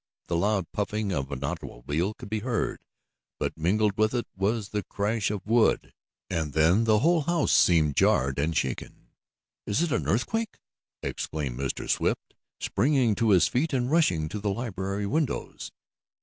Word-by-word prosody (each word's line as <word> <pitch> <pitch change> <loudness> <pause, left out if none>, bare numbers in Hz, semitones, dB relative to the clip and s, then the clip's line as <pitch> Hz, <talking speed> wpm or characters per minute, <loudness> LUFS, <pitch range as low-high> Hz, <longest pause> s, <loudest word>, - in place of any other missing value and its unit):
The 85 - 0
loud 100 +1 +1
puffing 105 0 -2
of 70 -6 -2
an 70 -1 -4
automobile 70 - -3
could - - -10
be 110 +1 -2
heard, 115 +1 -2 0.6
but - - -2
mingled 100 +6 +1
with 110 +3 +2
it 120 - -1
was 100 +2 -1
the 105 - -2
crash 105 +3 -1
of 105 -2 -4
wood, 115 +1 +2 0.3
and 80 -4 -2
then 85 +8 +4
the 110 -1 +4
whole 165 +2 +4
house 170 +3 +1
seemed 80 -5 +4
jarred 65 +1 +2
and 80 +2 0
shaken. 65 - -4 0.6
"Is 105 +11 +1
it 170 - -1
an - - 0
earthquake?" 220 - -1 0.5
exclaimed 70 -5 -3
Mr. 70 -1 -3
Swift, - - -1 0.3
springing 130 -5 +2
to 115 +1 +1
his 95 -4 +5
feet, 145 +5 0
and 125 0 0
rushing 90 - +2
to 105 - -4
the 105 0 -1
library 100 -2 -3
windows. 150 +7 -2
105 Hz, 165 wpm, -27 LUFS, 85-115 Hz, 0.6 s, his